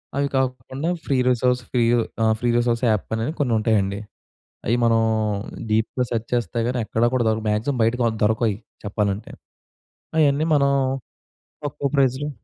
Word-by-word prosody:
అవి 140 Hz, 0 st, +1 dB
కాకుండా 130 Hz, +4 st, -1 dB, 0.2 s
free 135 Hz, -, +1 dB
resource 125 Hz, +1 st, +2 dB
free 125 Hz, -, +2 dB, 0.4 s
ఆ! -, -, +4 dB
ఫ్రీ 120 Hz, -, 0 dB
రిసోర్స్ 120 Hz, 0 st, +1 dB
యాప్ 105 Hz, -3 st, 0 dB
అని 110 Hz, +1 st, -1 dB
కొన్ని 125 Hz, -5 st, +1 dB
ఉంటాయండి. 105 Hz, -3 st, +1 dB, 0.7 s
అవి 115 Hz, -, +2 dB
మనం 115 Hz, -1 st, +4 dB, 0.7 s
డీప్‌గా 110 Hz, +3 st, +1 dB
సెర్చ్ 115 Hz, -1 st, -2 dB
చేస్తే 120 Hz, 0 st, -1 dB
గాని, 125 Hz, 0 st, -1 dB
ఎక్కడ 115 Hz, +2 st, -1 dB
కూడా 125 Hz, -2 st, +2 dB
దొరకదు. 110 Hz, 0 st, 0 dB
మాక్సిమమ్ 115 Hz, +5 st, 0 dB
బయటికి 120 Hz, +2 st, +1 dB, 0.2 s
దొరకవ‌యి 110 Hz, -1 st, +2 dB, 0.3 s
చెప్పాలంటే. 105 Hz, 0 st, -2 dB, 0.9 s
అయన్నీ 150 Hz, +1 st, +3 dB
మనం 140 Hz, -1 st, +3 dB, 0.9 s
తక్కువ 145 Hz, 0 st, -2 dB
ప్రైజ్‌లో 135 Hz, +2 st, +2 dB
120 Hz, 140 wpm, -23 LUFS, 110-130 Hz, 0.9 s, ఆ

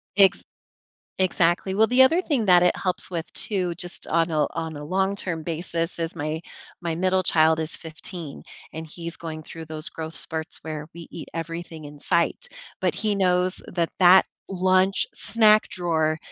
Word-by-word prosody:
Ex 195 Hz, -2 st, +5 dB, 0.8 s
exactly, 185 Hz, +1 st, +2 dB
well, 220 Hz, +2 st, +5 dB
the 250 Hz, +2 st, +5 dB
other 325 Hz, +8 st, +6 dB
thing 270 Hz, -, 0 dB
that 180 Hz, -1 st, +6 dB
it 180 Hz, -, +4 dB
helps 185 Hz, 0 st, -3 dB
with 170 Hz, -2 st, -4 dB
too- 180 Hz, -5 st, -2 dB
just 175 Hz, 0 st, -7 dB
on 165 Hz, 0 st, +1 dB
a 150 Hz, -2 st, +2 dB
on 160 Hz, -2 st, -3 dB
a 145 Hz, -, -7 dB
long 190 Hz, +5 st, 0 dB
term 165 Hz, -5 st, -4 dB
basis- 165 Hz, +1 st, -3 dB
is 165 Hz, +1 st, -3 dB
my 155 Hz, +2 st, -3 dB, 0.4 s
my 165 Hz, -2 st, -2 dB
middle 185 Hz, +1 st, +2 dB
child 160 Hz, -1 st, +4 dB
is 160 Hz, +1 st, -3 dB
15, 160 Hz, -1 st, -8 dB, 0.3 s
and 160 Hz, +1 st, -6 dB
he's 170 Hz, +1 st, -7 dB
going 155 Hz, -2 st, -6 dB
through 165 Hz, +1 st, -9 dB
those 155 Hz, 0 st, -6 dB
growth 160 Hz, 0 st, -7 dB
spurts 160 Hz, 0 st, -3 dB
where 155 Hz, -1 st, -5 dB
we 170 Hz, -, -9 dB
eat 165 Hz, -, -8 dB
everything 165 Hz, -1 st, -6 dB
in 145 Hz, 0 st, -11 dB
sight, 170 Hz, -, 0 dB, 0.3 s
but -, -, +1 dB
he 215 Hz, -2 st, 0 dB
knows 180 Hz, -1 st, +1 dB
that 170 Hz, -2 st, -1 dB
that 185 Hz, +1 st, +8 dB, 0.2 s
lunch, 185 Hz, +1 st, +3 dB
snack 215 Hz, 0 st, +4 dB
drawer 160 Hz, -4 st, 0 dB
170 Hz, 175 wpm, -24 LUFS, 160-185 Hz, 0.8 s, that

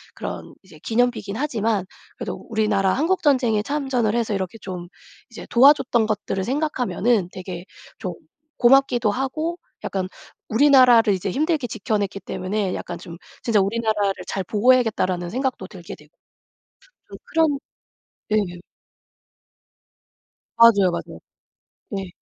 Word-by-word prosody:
그런 -, -, -7 dB
이제 -, -, -17 dB
기념비이긴 225 Hz, -3 st, 0 dB
하지만 225 Hz, -7 st, -1 dB, 0.3 s
그래도 -, -, -5 dB
우리나라 210 Hz, -4 st, +1 dB
한국전쟁에 275 Hz, -, +2 dB
참전을 260 Hz, -5 st, -1 dB
해서 230 Hz, -3 st, 0 dB
이렇게 190 Hz, +1 st, -3 dB
좀 180 Hz, -2 st, -6 dB, 0.4 s
이제 -, -, -10 dB
도와줬던 250 Hz, -3 st, +5 dB
것들을 205 Hz, -3 st, -2 dB
생각하면은 245 Hz, -, 0 dB
되게 180 Hz, -1 st, -7 dB, 0.3 s
좀 185 Hz, -5 st, -5 dB, 0.4 s
고맙기도 245 Hz, -3 st, +4 dB
하고 310 Hz, +8 st, -2 dB, 0.3 s
약간 190 Hz, -1 st, -2 dB, 0.4 s
우리나라를 245 Hz, -4 st, +6 dB
이제 190 Hz, +1 st, -2 dB
힘들게 300 Hz, -, 0 dB
지켜냈기 205 Hz, -1 st, -2 dB
때문에 190 Hz, +1 st, -3 dB
약간 175 Hz, -1 st, -5 dB
좀 170 Hz, -1 st, -10 dB, 0.3 s
'진짜 225 Hz, -3 st, +3 dB
우리나라를 210 Hz, 0 st, +1 dB, 0.2 s
잘 195 Hz, -2 st, -3 dB
보호해야겠다.'라는 210 Hz, -6 st, +2 dB
생각도 255 Hz, -5 st, -2 dB
들게 180 Hz, -4 st, -10 dB
되고 150 Hz, 0 st, -21 dB, 1.0 s
좀 -, -, -9 dB
그런 320 Hz, -4 st, +2 dB, 0.7 s
네. 215 Hz, -, +3 dB, 2.2 s
맞아요, 205 Hz, -5 st, +6 dB
맞아요. 170 Hz, -, -6 dB, 0.7 s
네. 195 Hz, -2 st, -4 dB
220 Hz, 300 characters per minute, -22 LUFS, 195-255 Hz, 2.2 s, 우리나라를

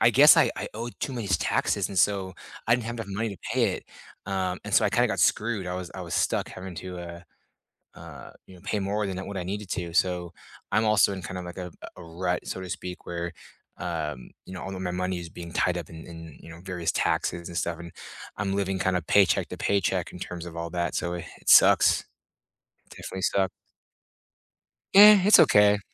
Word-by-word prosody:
I -, -, +6 dB
guess -, -, +7 dB
I -, -, +4 dB
I -, -, -4 dB
owed 115 Hz, +2 st, -6 dB
too 135 Hz, -, -3 dB
many 115 Hz, -5 st, -4 dB
taxes, 90 Hz, -, +1 dB
and 95 Hz, -, -2 dB
so, 95 Hz, -2 st, +2 dB, 0.3 s
I 115 Hz, -, +5 dB
didn't 120 Hz, -2 st, -2 dB
have 120 Hz, -, -4 dB
enough 115 Hz, -4 st, -6 dB
money 110 Hz, +4 st, -2 dB
to -, -, -14 dB, 0.2 s
pay -, -, +2 dB
it, -, -, -8 dB, 0.4 s
uh, 95 Hz, -2 st, -2 dB
and -, -, -7 dB
so, -, -, +5 dB
I -, -, 0 dB
kinda -, -, +3 dB
got -, -, -1 dB
screwed, 105 Hz, -4 st, +1 dB
I 90 Hz, -, -3 dB
was 90 Hz, -1 st, -6 dB
I 95 Hz, -, -6 dB
was 85 Hz, -3 st, -5 dB
stuck -, -, 0 dB
having 95 Hz, -1 st, -8 dB
to, 90 Hz, +1 st, -7 dB
uh, 85 Hz, -1 st, -8 dB, 0.8 s
uh, -, -, -11 dB, 0.2 s
you 95 Hz, -, -15 dB
know, 90 Hz, -, -16 dB
pay 105 Hz, -, -2 dB
more 100 Hz, +1 st, -1 dB
than 95 Hz, 0 st, -5 dB
what 100 Hz, -, -5 dB
I 90 Hz, -, -3 dB
needed 100 Hz, +2 st, -5 dB
to 85 Hz, -2 st, -3 dB
so, 90 Hz, -1 st, 0 dB, 0.4 s
I'm 110 Hz, +1 st, +2 dB
also 105 Hz, -2 st, +4 dB
in 95 Hz, -3 st, -6 dB
kind 90 Hz, -1 st, -5 dB
of 90 Hz, -, -7 dB
like 90 Hz, +1 st, -9 dB
a 90 Hz, -1 st, -6 dB, 0.3 s
a -, -, -10 dB
rut, 90 Hz, +2 st, -3 dB
so 95 Hz, -, -5 dB
to 95 Hz, -, -7 dB
speak, 90 Hz, +1 st, -7 dB
where, 85 Hz, 0 st, -4 dB, 0.4 s
um, 75 Hz, -6 st, -4 dB, 0.2 s
you 95 Hz, -, -10 dB
know, 90 Hz, -, -7 dB
all 95 Hz, 0 st, -6 dB
of 95 Hz, -, -6 dB
my 90 Hz, -, -2 dB
money 90 Hz, 0 st, -2 dB
is 85 Hz, -1 st, -8 dB
being 85 Hz, 0 st, -9 dB
tied 90 Hz, 0 st, +1 dB
up 85 Hz, -, -9 dB
in 80 Hz, -1 st, -10 dB
in, 80 Hz, -2 st, -11 dB
you -, -, -13 dB
know, 85 Hz, +1 st, -11 dB
various 90 Hz, -3 st, -2 dB
taxes 85 Hz, 0 st, -1 dB
and 85 Hz, -, -6 dB
stuff, 85 Hz, -2 st, -2 dB
and 85 Hz, -1 st, -9 dB, 0.5 s
I'm 95 Hz, -1 st, -1 dB
living 95 Hz, -1 st, -1 dB
kinda 90 Hz, -1 st, +1 dB
paycheck 95 Hz, +2 st, +3 dB
to -, -, -7 dB
paycheck 95 Hz, -3 st, 0 dB
in 90 Hz, -, -10 dB
terms 90 Hz, -2 st, -6 dB
of 85 Hz, -, -9 dB
all 85 Hz, 0 st, -4 dB
that, 85 Hz, 0 st, -2 dB
so 85 Hz, 0 st, -2 dB
it 85 Hz, -, -5 dB, 0.2 s
sucks. -, -, +6 dB, 0.9 s
Definitely 95 Hz, 0 st, -7 dB
suck. 95 Hz, -1 st, +1 dB, 1.4 s
Yeah, 205 Hz, 0 st, +10 dB
it's 210 Hz, -, +8 dB
okay. 105 Hz, 0 st, +5 dB
90 Hz, 220 wpm, -26 LUFS, 85-100 Hz, 1.4 s, Yeah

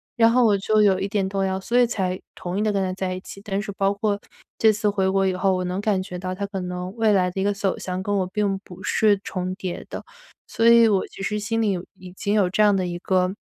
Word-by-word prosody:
然 230 Hz, -1 st, +5 dB
后 250 Hz, 0 st, +4 dB
我 210 Hz, -2 st, +4 dB
就 215 Hz, +2 st, +2 dB
有 190 Hz, -2 st, +4 dB
一 195 Hz, -, -1 dB
点 200 Hz, -1 st, -1 dB
动 195 Hz, 0 st, -1 dB
摇， 190 Hz, 0 st, -1 dB
所 240 Hz, +6 st, +1 dB
以 245 Hz, -, +6 dB
才 185 Hz, -5 st, -2 dB
同 180 Hz, +1 st, -5 dB
意 205 Hz, -, 0 dB
的 215 Hz, -, +1 dB
跟 200 Hz, -1 st, 0 dB
他 185 Hz, -1 st, -1 dB
在 185 Hz, -1 st, -3 dB
一 185 Hz, -, -5 dB
起。 195 Hz, -, -11 dB
但 200 Hz, -1 st, -2 dB
是 210 Hz, -, -5 dB
包 195 Hz, 0 st, +1 dB
括 205 Hz, 0 st, -1 dB, 0.4 s
这 220 Hz, -, +5 dB
次 210 Hz, 0 st, 0 dB
回 195 Hz, -2 st, +1 dB
国 195 Hz, 0 st, +2 dB
以 190 Hz, -, +1 dB
后， 190 Hz, +1 st, +1 dB
我 185 Hz, -, -2 dB
能 180 Hz, +2 st, -2 dB
感 205 Hz, -3 st, +1 dB
觉 180 Hz, -1 st, -7 dB
到 185 Hz, 0 st, -4 dB
他 200 Hz, +2 st, -3 dB
可 195 Hz, -1 st, -5 dB
能 180 Hz, +2 st, -5 dB
未 225 Hz, -2 st, +2 dB
来 185 Hz, -2 st, +3 dB
的 190 Hz, -, -3 dB
一 -, -, 0 dB
个 205 Hz, -, +2 dB
走 195 Hz, -1 st, -1 dB
向 185 Hz, 0 st, -4 dB
跟 205 Hz, +1 st, -1 dB
我 190 Hz, -2 st, 0 dB
并 195 Hz, 0 st, -1 dB
不 190 Hz, -1 st, -13 dB
是 205 Hz, -1 st, +3 dB
重 185 Hz, -1 st, -3 dB
叠 185 Hz, -2 st, -5 dB
的。 -, -, -6 dB, 0.4 s
所 225 Hz, +1 st, +1 dB
以 235 Hz, -1 st, +7 dB
我 195 Hz, -3 st, +2 dB
其 195 Hz, -, -9 dB
实 210 Hz, +1 st, -1 dB
心 225 Hz, +2 st, -1 dB
里 210 Hz, -, +2 dB
有 180 Hz, -2 st, -3 dB
已 180 Hz, -1 st, -12 dB
经 200 Hz, +2 st, -2 dB
有 195 Hz, -4 st, +3 dB
这 215 Hz, -, +1 dB
样 205 Hz, -1 st, +5 dB
的 185 Hz, -1 st, 0 dB
一 175 Hz, 0 st, -5 dB
个 185 Hz, 0 st, +1 dB
195 Hz, 305 characters per minute, -23 LUFS, 185-210 Hz, 0.4 s, 以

